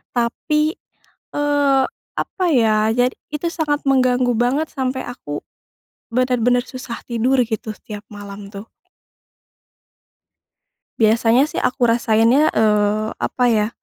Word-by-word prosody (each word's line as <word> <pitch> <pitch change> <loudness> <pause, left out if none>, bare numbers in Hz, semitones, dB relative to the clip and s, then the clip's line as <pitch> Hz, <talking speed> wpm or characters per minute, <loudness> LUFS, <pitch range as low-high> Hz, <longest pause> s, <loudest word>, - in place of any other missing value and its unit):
tapi, 300 +7 0 0.6
eee, 285 -2 +2 0.3
apa 370 - -2
ya, 220 -4 +3
jadi 250 +1 +1 0.2
itu 300 +3 -2
sangat 300 -3 -1
mengganggu 255 -2 +3
banget 275 +6 +1
sampai 260 -2 -2
aku, 145 -12 -6 0.7
bener-bener 245 0 +2
susah 255 -2 -7
tidur 250 +3 +1
gitu 220 -1 -4
setiap 210 -1 -9
malam 205 -1 -9
tuh. 200 +2 -9 2.3
Biasanya 230 +4 +4
sih - - -4
aku 250 - -1
rasainnya, 230 +4 +3
eee, 215 0 +2
apa 250 - -1
ya? 215 0 +1
245 Hz, 110 wpm, -20 LUFS, 220-270 Hz, 2.3 s, Biasanya